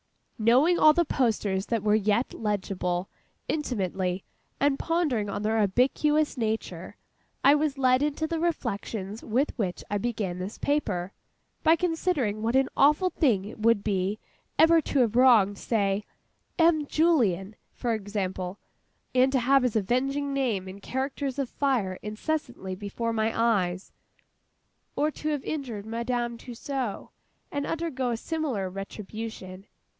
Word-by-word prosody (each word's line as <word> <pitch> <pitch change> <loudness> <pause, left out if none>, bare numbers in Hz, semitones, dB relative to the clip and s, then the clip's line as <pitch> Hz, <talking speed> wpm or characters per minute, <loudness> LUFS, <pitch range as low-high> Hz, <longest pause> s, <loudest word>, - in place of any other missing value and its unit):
Knowing 260 +11 +4
all 310 - +7
the 345 +2 +2
posters 210 -8 0
that 230 -3 -1
were 210 -1 +3
yet 215 +3 +1
legible, 190 -4 -2 0.4
intimately, 190 - -2 0.4
and 280 -1 +2
pondering 300 -11 0
on 205 - -3
their 220 +1 +2
ubiquitous 275 +9 +2
nature, 225 -3 -3 0.5
I 280 - +7
was 295 -1 +1
led 255 -1 +3
into 300 +2 0
the 325 0 -2
reflections 225 - -3
with 255 +6 0
which 185 -5 -2
I 205 - +1
began 205 -5 -2
this 190 +4 -5
paper, 205 -11 -1 0.5
by 320 - +5
considering 325 - 0
what 230 +3 0
an 265 0 +3
awful 300 +6 +4
thing 225 - +2
it 215 - -9
would 225 -2 +3
be, 195 0 0 0.4
ever 325 0 +6
to 280 -2 +1
have 230 -2 +1
wronged—say 205 -4 +3 0.5
M. 325 -3 +4
JULLIEN 220 - +2 0.2
for 240 -2 -2
example—and 205 +5 -3
to 265 - +2
have 270 +3 +4
his 250 -3 0
avenging 270 +7 0
name 235 -9 -1
in 190 +2 -9
characters 265 +3 -3
of 275 -2 -1
fire 235 -10 0
incessantly 220 -2 -3
before 205 +4 -3
my 220 0 +1
eyes. 190 -5 +1 1.0
Or 300 +1 +1
to 305 - -4
have 295 -3 -1
injured 245 -9 -4
MADAME 235 +1 -2
TUSSAUD, 250 -2 -4 0.4
and 285 -1 -2
undergo 305 -6 -2
a 235 - -1
similar 275 - -2
retribution. 195 0 -7
235 Hz, 135 wpm, -27 LUFS, 205-280 Hz, 1.0 s, all